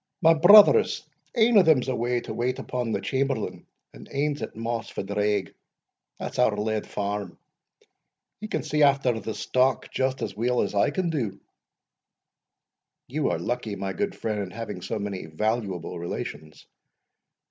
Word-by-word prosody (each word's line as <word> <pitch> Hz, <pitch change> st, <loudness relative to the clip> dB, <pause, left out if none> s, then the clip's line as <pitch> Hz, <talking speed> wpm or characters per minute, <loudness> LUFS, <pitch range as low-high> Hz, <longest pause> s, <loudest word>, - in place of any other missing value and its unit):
My 165 Hz, +1 st, +7 dB
brothers, 205 Hz, -, +7 dB, 0.3 s
ane 225 Hz, -1 st, +6 dB
o' -, -, +8 dB
them's 155 Hz, -8 st, +3 dB
away 120 Hz, -1 st, 0 dB
to -, -, -6 dB
wait 125 Hz, +2 st, -1 dB
upon 125 Hz, -2 st, -3 dB
the -, -, -1 dB
chamberlain, 135 Hz, 0 st, -2 dB, 0.3 s
and -, -, -13 dB
ane's 145 Hz, +1 st, -1 dB
at -, -, -6 dB
Moss 115 Hz, +1 st, -3 dB
phadraig, 105 Hz, -1 st, -1 dB, 0.6 s
that's -, -, -6 dB
our 110 Hz, -4 st, +3 dB
led 110 Hz, +1 st, -2 dB
farm 100 Hz, 0 st, -4 dB, 1.0 s
he 215 Hz, -, -6 dB
can -, -, -2 dB
see 150 Hz, 0 st, -1 dB
after 135 Hz, -5 st, +3 dB
the 110 Hz, -1 st, -5 dB
stock 130 Hz, -1 st, +1 dB
just 130 Hz, 0 st, -1 dB
as -, -, -4 dB
weel 120 Hz, +3 st, +1 dB
as -, -, -2 dB
I 100 Hz, -, +3 dB
can 185 Hz, -3 st, -1 dB
do." 115 Hz, -11 st, -3 dB, 1.7 s
"You 145 Hz, +3 st, -1 dB
are -, -, 0 dB
lucky, 115 Hz, -4 st, -3 dB
my 95 Hz, -1 st, -4 dB
good 200 Hz, -2 st, -2 dB
friend, 105 Hz, -2 st, -2 dB
in 95 Hz, -, -5 dB
having 115 Hz, -3 st, -6 dB
so 95 Hz, -, -3 dB
many 100 Hz, -4 st, -5 dB
valuable 95 Hz, 0 st, -2 dB
relations." 75 Hz, -3 st, -6 dB
120 Hz, 155 wpm, -26 LUFS, 105-140 Hz, 1.7 s, o